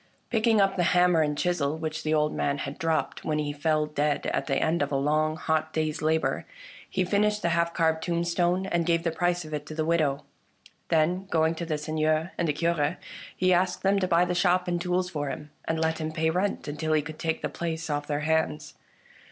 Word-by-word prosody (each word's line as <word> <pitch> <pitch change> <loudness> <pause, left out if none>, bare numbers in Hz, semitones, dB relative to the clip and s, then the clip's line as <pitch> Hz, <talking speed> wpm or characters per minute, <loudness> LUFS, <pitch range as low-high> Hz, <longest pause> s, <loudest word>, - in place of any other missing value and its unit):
Picking 225 -1 +3
up 195 -1 +2
the - - +2 0.2
hammer 175 -2 +5
and 150 -1 0
chisel 160 -4 0
which 155 0 -4
the 155 - -2
old 150 -1 +2
man 140 0 0
had 140 0 -5
dropped 160 -1 -1
when 155 -1 -1
he 150 -1 -2
fell 155 +1 +1
dead 150 -1 -1
at - - -1
the - - +1
end 165 +1 +1
of 145 - -1
a - - 0
long 155 +3 +1
hot 155 0 -1
day's 155 -2 -1
labour, 160 +1 0 0.4
he 185 - 0
finished 210 +2 +1
the 170 - +2
half 170 0 +1
carved 160 -1 +2
tombstone, 175 +2 0
and 170 -3 0
gave 165 -1 +2
the 165 - 0
price 175 +1 0
of 155 - -9
it 150 -1 -3
to 155 - -7
the 155 0 -1
widow. 155 -4 +1 0.7
Then, 170 +4 +2
going 160 -2 +2
to 165 0 -5
the 155 -2 -1
Seigneur 155 +2 0
and 170 - +1
Cure, 165 0 0 0.4
he 185 0 +3
asked 180 +1 +1
them 195 +1 +3
to 185 - 0
buy 170 0 +4
the 180 - -1
shop 180 0 +2
and 175 -1 -1
tools 180 0 0
for 145 -5 -3
him, 150 +2 -7
and 160 0 -1
let 160 0 0
him 155 0 -2
pay 160 0 0
rent 185 +2 -1
until 155 +2 -2
he 155 -1 +2
could 155 +1 -9
take 160 -1 -2
the - - +1
place 165 -1 -4
off 145 -1 -2
their 145 0 -1
hands. 155 -1 0
160 Hz, 225 wpm, -27 LUFS, 155-175 Hz, 0.7 s, hammer